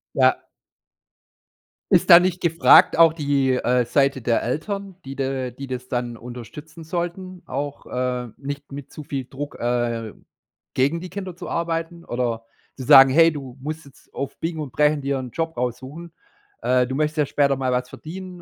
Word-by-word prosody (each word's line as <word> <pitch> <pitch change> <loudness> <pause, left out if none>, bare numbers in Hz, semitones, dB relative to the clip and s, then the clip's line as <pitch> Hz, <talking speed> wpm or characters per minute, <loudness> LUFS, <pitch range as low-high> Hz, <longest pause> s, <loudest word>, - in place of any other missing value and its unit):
Ja. - - +4 1.5
Ist - - +4
da 170 - +12
nicht 180 0 0
gefragt 170 -2 +5
auch 165 -1 +7
die, 140 -4 +1
äh, 125 0 +2
Seite 135 +2 +1
der 115 0 +1
Eltern, 195 - -4
die 135 +1 -7
da 135 -2 -2
die 135 +3 -9
das 125 -1 -6
dann 120 -2 -3
unterstützen 125 +8 -10
sollten, 175 +2 -5
auch, 140 +2 -5
äh, 125 -1 -2
nicht 140 +1 -7
mit 140 -1 -9
zu 155 - -9
viel 135 -2 -4
Druck, 145 +3 -7
äh, 120 -2 -1 0.6
gegen 140 +6 +2
die 180 - -7
Kinder 185 -2 -6
zu 175 0 -8
arbeiten 170 0 -3
oder 120 -2 -2 0.3
zu 130 - -6
sagen: 135 +2 +9
„Hey, 165 +4 +5
du 135 -4 -8
musst 155 +3 -6
jetzt 140 -1 -20
auf 140 0 -5
Biegen 165 -1 -3
und 145 -4 -6
Brechen 150 +1 +2
dir 140 0 -1
'n 125 -2 -6
Job 165 +2 -3
raussuchen. 130 +7 -5 0.5
Äh, 125 0 +2
du 130 - -5
möchtest 155 +2 -1
ja 150 - +3
später 140 0 +2
mal 130 -1 -1
was 125 0 -1
verdienen. 180 +2 -9
140 Hz, 175 wpm, -22 LUFS, 125-165 Hz, 1.5 s, da